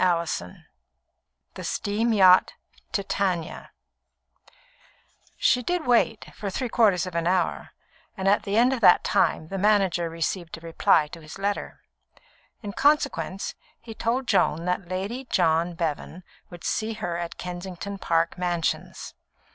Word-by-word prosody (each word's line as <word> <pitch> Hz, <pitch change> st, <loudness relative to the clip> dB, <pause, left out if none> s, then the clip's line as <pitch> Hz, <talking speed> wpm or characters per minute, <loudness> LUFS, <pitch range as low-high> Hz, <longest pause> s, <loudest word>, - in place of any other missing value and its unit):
CHAPTER 170 Hz, -, +1 dB
IV -, -, -15 dB, 1.0 s
The -, -, -8 dB
Steam 220 Hz, +3 st, -1 dB
Yacht 185 Hz, -4 st, +6 dB, 0.4 s
Titania 190 Hz, -4 st, -2 dB, 1.7 s
She 250 Hz, -, +3 dB
did 350 Hz, +5 st, -2 dB
wait, 235 Hz, -2 st, +1 dB
for 205 Hz, -, -5 dB
three 245 Hz, +6 st, -3 dB
quarters 205 Hz, -7 st, +3 dB
of 185 Hz, -, -7 dB
an 170 Hz, 0 st, -1 dB
hour; 180 Hz, -1 st, 0 dB, 0.5 s
and 190 Hz, 0 st, -2 dB
at 200 Hz, +1 st, +4 dB
the 205 Hz, 0 st, -2 dB
end 245 Hz, +3 st, +4 dB
of 255 Hz, -, -3 dB
that 180 Hz, -, +6 dB
time 155 Hz, -, +1 dB
the 195 Hz, -, -4 dB
manager 195 Hz, -4 st, +2 dB
received 165 Hz, +1 st, -3 dB
a -, -, -14 dB
reply 165 Hz, -1 st, +3 dB
to 165 Hz, -, -10 dB
his 155 Hz, +3 st, -10 dB
letter. 200 Hz, +1 st, -3 dB, 0.8 s
In 205 Hz, -1 st, -5 dB
consequence, 280 Hz, -9 st, +1 dB, 0.3 s
he 230 Hz, -1 st, -10 dB
told 235 Hz, +4 st, -1 dB
Joan 170 Hz, -7 st, +1 dB
that 180 Hz, 0 st, -2 dB
Lady 200 Hz, +8 st, -4 dB
John 165 Hz, -5 st, +1 dB
Bevan 165 Hz, +2 st, -4 dB, 0.3 s
would 175 Hz, -1 st, -12 dB
see 225 Hz, +1 st, -1 dB
her 175 Hz, -6 st, -4 dB
at 170 Hz, -1 st, -5 dB
Kensington 180 Hz, +2 st, -6 dB
Park 165 Hz, +1 st, 0 dB
Mansions. 175 Hz, -2 st, -2 dB
190 Hz, 140 wpm, -25 LUFS, 170-215 Hz, 1.7 s, Yacht